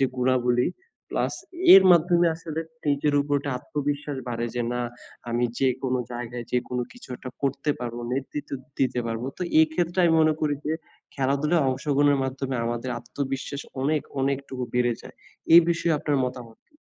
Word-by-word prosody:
যে 135 - +4
গুণাবলী, 125 -1 +2 0.4
প্লাস - - -1 0.4
এর 195 - +10
মাধ্যমে 175 +1 +4
আসলে 160 -1 -5 0.3
নিজের 145 +1 +2
উপর 145 0 +1
একটা 140 0 -4
আত্মবিশ্বাস 145 0 -3
বাড়ে। 120 0 -2
যে 120 - 0
না, 125 - -1 0.5
আমি 120 +1 +1
যেকোনো 130 -1 +1
জায়গায় 120 0 -5
যেকোনো 125 0 -1
কিছু 245 - -14
একটা 130 - -8
করতে 140 +2 0
পারব, 120 -1 -4 0.2
নেতৃত্ব 140 +2 -4 0.3
দিতে 130 -2 +1
পারব। 115 0 -3 0.2
তো - - -2 0.2
এই 160 - +6
ক্ষেত্রে 175 +2 -1
আমি 165 - +4
মনে 155 -1 +4
করি 150 -1 +1
যে 155 - +1 0.4
খেলাধুলায় 140 +4 +1
অংশগ্রহণের 140 +1 +2
মাধ্যমে 130 0 -3
আমাদের 120 +2 -2
আত্মবিশ্বাস 135 +3 -4 0.2
অনেক 150 +2 +1 0.2
অনেকটুকু 135 -1 -2
বেড়ে 120 -1 +3
যায়। - - -12 0.4
এই 170 - +12
বিষয়ে 165 -2 +1
আপনার 145 0 0
মতামত 125 -3 -7
কী? 300 - -38
135 Hz, 160 wpm, -25 LUFS, 125-150 Hz, 0.5 s, এই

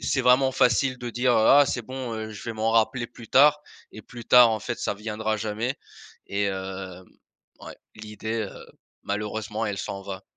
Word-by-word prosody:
c'est 135 - 0
vraiment 130 +1 +4
facile 130 +1 +2
de 120 -1 -5
dire, 125 +2 +1
heu: 110 -2 +3
«Ah! 145 +1 +7
C'est 125 - -2
bon, 130 0 -6
heu, 110 0 -5
je 105 - -10
vais 115 - -4
m'en 110 0 -1
rappeler 120 +2 +1
plus 120 -2 -14
tard» 150 +2 +5 0.3
et 110 - -11
plus 120 +2 -11
tard, 125 -2 +7
en 110 -1 -2
fait, 120 +2 -5
ça - - -2
viendra 110 +1 -3
jamais 110 +5 -3 0.5
et 100 +1 -1
hem, 95 -1 -5 0.6
ouais, - - -10 0.2
l'idée, 110 +1 -5
heu, - - -12 0.4
malheureusement 105 +1 -3
elle 100 -2 -3
s'en 100 +1 -5
va 95 -1 -7
110 Hz, 190 wpm, -25 LUFS, 105-125 Hz, 0.6 s, Ah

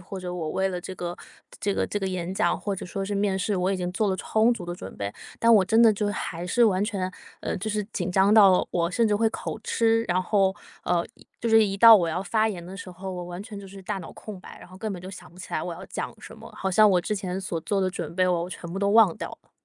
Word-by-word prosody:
或 190 +2 -8
者 180 -1 -5
我 165 -3 -3
为 190 +3 0
了 180 -1 -4
这 190 - -7
个 175 -1 -5 0.5
这 200 -1 0
个 - - 0
这 205 - -3
个 190 - -1
演 185 0 -3
讲 - - +1
或 200 -2 -3
者 185 - -7
说 195 +2 -4
是 205 +1 -3
面 200 -1 0
试， 200 +2 -1
我 185 +1 0
已 195 - 0
经 180 0 -3
做 210 +2 0
了 190 - 0
充 220 +4 +2
足 180 - -7
的 175 0 -5
准 95 - -9
备， 100 0 -4 0.3
但 230 0 +5
我 200 - +6
真 225 +4 +4
的 225 -2 +7
就 205 0 -1
还 175 -3 -4
是 240 +6 +3
完 195 -2 +2
全 190 -4 -2 0.3
呃， - - -3
就 215 +4 -4
是 210 -1 -1
紧 180 -1 -2
张 195 +2 +4
到 195 -4 +6
我 170 -1 0
甚 225 +5 +2
至 205 - +2
会 225 +1 +3
口 - - -5
吃， 225 0 +2
然 180 -2 0
后， 195 0 +2 0.3
呃， 170 -1 +1
一 - - -20
就 235 - -1
是 225 -1 +6
一 195 0 -3
到 225 +1 +10
我 170 -3 +1
要 180 +3 -2
发 220 +3 +1
言 175 -5 -6
的 190 +2 -9
时 200 - -8
候， 185 +2 -7
我 180 -1 -5
完 175 +2 -7
全 210 -2 -9
就 200 - -9
是 195 0 -11
大 195 - -3
脑 180 - -9
空 205 -4 -9
白， - - -12
然 - - -13
后 185 - -13
根 215 0 -3
本 180 -1 -7
就 185 - -7
想 190 - -11
不 - - -19
起 185 - -10
来 - - 0
我 170 0 -4
要 - - -9
讲 - - -5
什 - - -11
么， - - -11
好 190 - -2
像 215 +3 +6
我 185 -3 +3
之 210 +4 -2
前 190 -1 -3
所 170 -3 -3
做 200 -2 0
的 185 0 +1
准 165 -3 -6
备 185 0 +2
我 175 0 0
全 170 -2 -8
部 195 - -3
都 200 0 +1
忘 215 -6 +5
掉 - - -5
了。 - - -35
190 Hz, 320 characters per minute, -26 LUFS, 180-205 Hz, 0.5 s, 到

